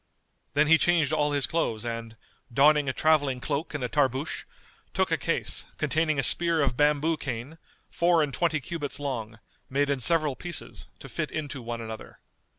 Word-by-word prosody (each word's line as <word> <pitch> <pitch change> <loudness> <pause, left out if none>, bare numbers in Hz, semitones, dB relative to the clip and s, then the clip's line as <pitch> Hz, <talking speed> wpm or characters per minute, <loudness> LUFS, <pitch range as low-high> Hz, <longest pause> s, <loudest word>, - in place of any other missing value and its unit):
Then 150 +1 +5
he 160 +1 +5
changed 165 -4 +3
all 150 -1 +1
his 145 -2 +1
clothes 120 -9 -1
and, 115 -1 -5 0.3
donning 145 +2 +4
a - - +2
travelling 145 -3 +2
cloak 150 +4 -3
and 145 - -3
a - - 0
tarboosh, 135 +1 -1 0.5
took - - +1
a - - +4
case, - - -2
containing 155 -1 +1
a 135 - +1
spear 170 -1 +4
of 130 -3 0
bamboo 150 +3 +2
cane, 135 +3 -6 0.3
four 170 -2 +3
and 145 -2 -3
twenty 160 -3 +1
cubits 145 0 -5
long, 115 -6 -4 0.3
made 140 +2 +1
in 140 - 0
several 155 +1 +2
pieces, 175 +3 -6
to - - -11
fit - - -3
into 145 -4 -5
one 115 0 -5
another. 110 -1 -8
145 Hz, 175 wpm, -27 LUFS, 130-155 Hz, 0.5 s, Then